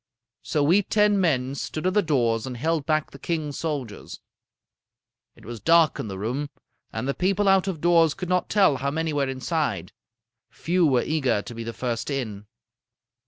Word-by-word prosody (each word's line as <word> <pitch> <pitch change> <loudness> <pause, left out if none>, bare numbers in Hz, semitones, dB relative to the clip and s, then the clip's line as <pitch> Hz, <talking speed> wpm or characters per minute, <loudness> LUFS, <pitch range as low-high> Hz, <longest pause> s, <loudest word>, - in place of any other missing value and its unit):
"So 150 - 0
we 175 +8 +4
ten 210 0 +2
men 135 -7 +1
stood 155 +3 -5
at 185 - +2
the 210 - +4
doors 120 - 0
and 125 -2 -6
held 160 +2 -1
back 155 -1 0
the 140 - -12
king's 155 -2 -3
soldiers. 140 -10 -5 1.2
It - - -18
was 115 +1 -7
dark 165 - +4
in - - -3
the 95 -2 -6
room, 125 +8 -3 0.4
and - - -4
the 140 - 0
people 195 +4 +1
out 195 0 +4
of 175 -6 -3
doors 165 -2 +4
could 180 -2 -5
not 180 0 0
tell 190 -9 +4
how 140 +2 -1
many 160 +2 -2
were 140 -2 0
inside. 130 - -2 0.6
Few 180 +2 0
were 130 -4 +2
eager 130 -9 0
to - - -9
be 115 0 -6
the 115 - -4
first 120 +1 -3
in. 110 -7 -4
145 Hz, 185 wpm, -25 LUFS, 125-170 Hz, 1.2 s, we